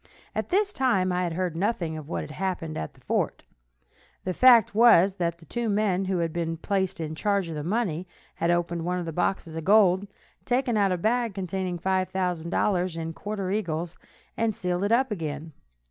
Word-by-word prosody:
At -, -, -3 dB
this 405 Hz, +2 st, +1 dB
time 195 Hz, -9 st, +2 dB
I 180 Hz, 0 st, 0 dB
had 175 Hz, -2 st, -1 dB
heard 180 Hz, -1 st, -2 dB
nothing 170 Hz, -3 st, -1 dB
of 155 Hz, -2 st, -8 dB
what 85 Hz, -, -2 dB
had 75 Hz, -, -8 dB
happened 180 Hz, -5 st, -3 dB
at 80 Hz, -, -5 dB
the -, -, -21 dB
fort. -, -, -1 dB, 0.8 s
The 185 Hz, -, -2 dB
fact 240 Hz, -2 st, +6 dB
was 200 Hz, -4 st, +6 dB
that 170 Hz, -2 st, -1 dB
the 165 Hz, -, -17 dB
two 240 Hz, +3 st, -2 dB
men 200 Hz, -2 st, +1 dB
who 190 Hz, -1 st, 0 dB
had 165 Hz, -2 st, -1 dB
been 165 Hz, -1 st, -2 dB
placed 190 Hz, +1 st, -1 dB
in 155 Hz, -1 st, -3 dB
charge 200 Hz, +1 st, 0 dB
of 160 Hz, -, -5 dB
the 150 Hz, -, -4 dB
money 185 Hz, -2 st, -1 dB, 0.3 s
had 170 Hz, -, -1 dB
opened 175 Hz, -1 st, 0 dB
one 180 Hz, +1 st, -1 dB
of 175 Hz, -, -3 dB
the 165 Hz, -, -5 dB
boxes 175 Hz, -1 st, -1 dB
of 165 Hz, -, -4 dB
gold, 200 Hz, -1 st, +5 dB, 0.4 s
taken 250 Hz, -1 st, +1 dB
out 200 Hz, -2 st, +3 dB
a 180 Hz, -, +1 dB
bag 230 Hz, +2 st, 0 dB
containing 185 Hz, -1 st, -3 dB
$5,000 185 Hz, -1 st, 0 dB
in 165 Hz, 0 st, -4 dB
quarter 200 Hz, 0 st, -4 dB
eagles, 175 Hz, -4 st, -2 dB, 0.4 s
and 225 Hz, -2 st, 0 dB
sealed 180 Hz, 0 st, -1 dB
it 205 Hz, -, 0 dB
up 255 Hz, +1 st, +3 dB
again. 160 Hz, -4 st, -4 dB
185 Hz, 195 wpm, -26 LUFS, 170-205 Hz, 0.8 s, fact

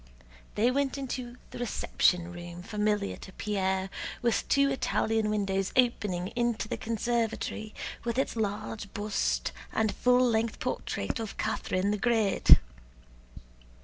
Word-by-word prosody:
They 235 Hz, +4 st, +3 dB
went 280 Hz, +1 st, 0 dB
into 250 Hz, -2 st, -5 dB
the -, -, -7 dB
reception 180 Hz, -6 st, +1 dB
room 175 Hz, 0 st, -8 dB
familiar 210 Hz, -1 st, 0 dB
to 190 Hz, -, -11 dB
Pierre, 190 Hz, -2 st, -1 dB, 0.3 s
with 235 Hz, -4 st, +1 dB
two 280 Hz, 0 st, +4 dB
Italian 225 Hz, -4 st, +1 dB
windows 195 Hz, -2 st, 0 dB
opening 210 Hz, -8 st, +2 dB
into 235 Hz, -2 st, -1 dB
the -, -, -2 dB
conservatory, 225 Hz, -1 st, -2 dB, 0.3 s
with 235 Hz, 0 st, -2 dB
its 270 Hz, -, 0 dB
large 210 Hz, -1 st, -3 dB
bust 210 Hz, -1 st, 0 dB, 0.2 s
and 220 Hz, -1 st, +1 dB
full 250 Hz, 0 st, +4 dB
length 225 Hz, -1 st, +1 dB
portrait -, -, -2 dB
of 220 Hz, -2 st, -5 dB
Catherine 200 Hz, -2 st, 0 dB
the 210 Hz, -, -1 dB
Great. 225 Hz, -3 st, +5 dB
215 Hz, 125 wpm, -29 LUFS, 200-240 Hz, 0.3 s, Great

